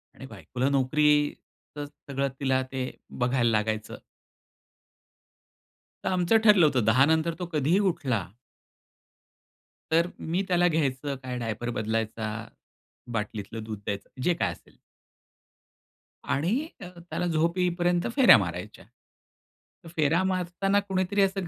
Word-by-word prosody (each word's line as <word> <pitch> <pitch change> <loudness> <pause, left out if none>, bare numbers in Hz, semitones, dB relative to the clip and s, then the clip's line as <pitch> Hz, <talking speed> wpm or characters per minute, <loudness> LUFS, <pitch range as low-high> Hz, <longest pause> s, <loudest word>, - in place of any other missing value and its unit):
आणि 135 - -10
बायकोला 120 - -3
नोकरीचं 145 +1 0
सगळं 140 -1 -4
तिला 130 -1 +1
ते 130 -1 -2 0.3
बघायला 125 -1 +2
लागायचं. 110 0 -1 2.1
तर - - +1
आमचं 185 +4 +3
ठरलं 205 -7 +7
होतं 130 -7 +2
10 130 +5 +5
नंतर 160 +1 +2
तो 180 - -2
कधीही 155 +6 +2
उठला 120 -9 -2 1.7
तर 165 +2 +4
मी 175 +4 -1
त्याला 175 -1 +3
घ्यायचं 140 -3 -1
काय 125 -1 -4
डायपर 115 +1 -3
बदलायचा, 110 0 -2 0.8
बाटलीतलं 105 0 -4
दूध 110 -2 -6
द्यायचं, 100 -1 -4
जे 175 - +3
काय - - -1
असेल. - - -15 1.5
आणि 220 - 0
अ, - - -6 0.2
त्याला - - -2
झोपे 170 +3 +1
येईपर्यंत 175 0 +1
फेऱ्या 260 - +8
मारायच्या. 90 -2 -5 1.0
फेरा 165 +2 +1
मारताना 190 +2 0
कुणीतरी 195 0 0
असं 195 -2 +1
145 Hz, 115 wpm, -27 LUFS, 120-175 Hz, 2.1 s, फेऱ्या